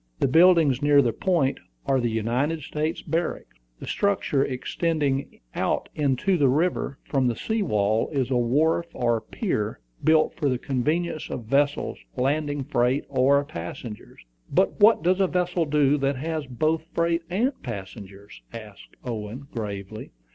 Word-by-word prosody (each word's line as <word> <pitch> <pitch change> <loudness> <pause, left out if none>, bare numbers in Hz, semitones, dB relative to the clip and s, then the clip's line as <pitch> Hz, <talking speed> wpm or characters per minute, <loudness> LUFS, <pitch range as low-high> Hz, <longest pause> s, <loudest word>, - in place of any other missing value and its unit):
The - - +2
buildings 160 -3 +5
near 145 0 +5
the 120 -2 0
point 170 -8 0 0.3
are 135 -1 +2
the 120 -1 0
United 125 +8 -1
States 155 +3 -3
Barracks. 160 - -3 0.2
The - - -8
structure 195 -9 +1
extending 140 +1 -2
out - - -1
into 150 +6 +1
the 140 -2 +4
river 150 -1 0
from 135 -3 0
the 120 - 0
sea 220 - -2
wall 105 - +1
is 135 -3 -1
a - - +2
wharf 150 +8 +2
or 120 -2 +1
pier, 110 - -3 0.2
built 155 0 +4
for 145 - 0
the 130 - 0
convenience 155 +6 -2
of 115 - -5
vessels 140 +4 0 0.2
landing 145 +2 0
freight 125 +2 +1
or 140 +1 +3
passengers." 85 - -8 0.3
"But 190 +7 +1
what 210 -5 +6
does 185 +2 +2
a 190 - +3
vessel 180 -1 0
do 145 -1 +2
that 140 +1 0
has 155 +2 -3
both 155 +6 -1
freight 170 0 +1
and 230 +10 +1
passengers?" 100 -3 -9
asked 110 -3 -11
Owen, 120 +3 -6
gravely. 105 -1 -6
140 Hz, 150 wpm, -25 LUFS, 120-160 Hz, 0.3 s, what